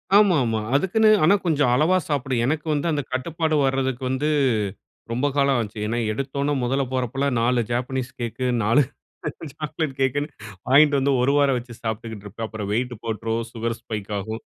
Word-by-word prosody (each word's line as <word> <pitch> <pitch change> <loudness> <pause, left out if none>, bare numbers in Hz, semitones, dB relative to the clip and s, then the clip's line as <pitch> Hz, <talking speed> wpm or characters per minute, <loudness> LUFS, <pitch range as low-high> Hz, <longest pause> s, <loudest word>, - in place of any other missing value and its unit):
ஆமா, 205 -3 +6
ஆமா. 110 -1 0 0.2
அதுக்குன்னு 215 +8 +3
ஆனா 175 +6 +6
கொஞ்சம் 150 -6 +2
அளவா 160 +7 +3
சாப்பிடு. 135 -3 -1
எனக்கு 150 +4 -1
வந்து 150 +3 0
அந்த 150 -2 0
கட்டுப்பாடு 160 +4 -1
வர்றதுக்கு 130 -1 -1
வந்து 130 +3 0 0.8
ரொம்ப 125 +5 +1
காலம் 140 -2 +3
ஆச்சு. 110 -1 -4
ஏன்னா 115 +2 -1
எடுத்தோன்ன 140 +4 -1
முதல்ல 135 +3 +1
போறப்பலாம் 130 +1 -1
4 120 +1 +2
ஜாப்பனீஸ் 125 +1 -2
கேக்கு, 120 +2 -3 0.2
4 115 +7 +4 0.7
சாக்லேட் 155 -1 -3
கேக்குன்னு 145 +3 +1 0.4
வாங்கிட்டு 145 +2 +6
வந்து 135 +1 +2
ஒரு 130 +2 +3
வாரம் 140 -3 +3
வச்சு 120 0 -8
சாப்பிட்டுக்கிட்டு 110 -2 -5
இருப்பேன். 110 +3 -5
அப்புறம் 110 -2 -5
வெயிட் 125 +2 -1
போட்ரும், 115 0 -2
சுகர் 115 0 -3
ஸ்பைக் 105 -3 -6
ஆகும். 110 +3 -5
130 Hz, 160 wpm, -23 LUFS, 115-145 Hz, 0.8 s, ஆமா